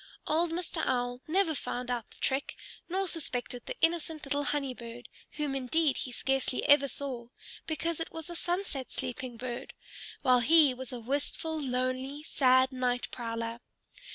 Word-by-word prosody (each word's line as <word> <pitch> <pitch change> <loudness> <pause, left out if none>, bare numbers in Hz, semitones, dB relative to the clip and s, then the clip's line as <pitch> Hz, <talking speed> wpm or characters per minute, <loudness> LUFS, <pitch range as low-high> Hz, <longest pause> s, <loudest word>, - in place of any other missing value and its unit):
Old 330 +2 +2
Mr. 340 0 -2
Owl 245 -1 0
never 345 0 +3
found 250 -3 -3
out 240 -3 -2
the - - -16
trick, 270 +1 0 0.3
nor 380 +2 0
suspected 250 -7 -3
the - - -5
innocent 325 -2 +1
little 285 +1 0
Honey 280 -3 0
Bird, 235 0 -9 0.3
whom 295 -2 -1
indeed 275 +3 +2
he 255 - -3
scarcely 265 +1 0
ever 285 -1 +7
saw, 255 -4 -5 0.4
because 330 +1 -1
it 330 - -3
was 325 -1 -6
a 345 - -6
sunset 345 -7 -2
sleeping 245 -1 -3
bird, 240 0 -5 0.5
while 255 -1 +6
he 295 +2 +6
was 260 0 -6
a 250 - -4
wistful, 290 +5 -2
lonely, 260 +2 -1
sad 260 -3 +4
night 250 -1 0
prowler. 230 -1 -3
270 Hz, 155 wpm, -31 LUFS, 250-315 Hz, 0.5 s, ever